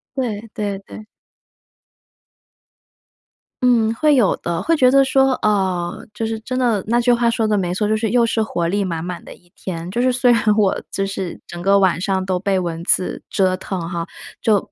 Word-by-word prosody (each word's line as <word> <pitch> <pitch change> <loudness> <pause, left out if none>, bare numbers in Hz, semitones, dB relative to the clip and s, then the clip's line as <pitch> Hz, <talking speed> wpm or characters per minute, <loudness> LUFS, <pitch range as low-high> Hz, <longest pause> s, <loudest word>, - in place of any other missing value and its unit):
对 230 -5 -3
对 205 -2 -3
对。 215 +2 -12 2.6
嗯， 230 -3 +3
会 300 +3 +3
有 230 -8 +3
的， 170 0 -3
会 330 - +2
觉 255 -4 +4
得 275 0 +6
说， 270 0 +3
啊， 190 -4 +1 0.2
就 225 +2 -3
是 225 0 -3
真 255 +3 -4
的 230 -6 +1
那 235 +2 +2
句 245 +1 +3
话 235 0 +2
说 225 -1 0
得 210 -1 +1
没 180 -2 -1
错， 210 +3 0
就 215 - +2
是 220 0 -1
又 235 +2 +3
是 225 -1 0
活 175 -6 -2
力 200 +4 0
满 165 -4 -3
满 180 0 -6
的 - - -11
一 175 - -23
天。 170 -2 -6
就 235 +6 -1
是 255 +1 +3
虽 250 0 +3
然 235 - +2
我， 200 -3 +2
就 195 - -1
是 195 -2 -5
整 175 - -8
个 200 +2 +4
晚 185 -3 +2
上 190 0 -1
都 185 -1 0
被 195 +1 0
蚊 170 -2 -4
子 180 - 0
折 185 -1 +1
腾 190 0 -5
哈， 170 -2 -3 0.4
就 215 -3 +3
205 Hz, 215 characters per minute, -20 LUFS, 185-235 Hz, 2.6 s, 得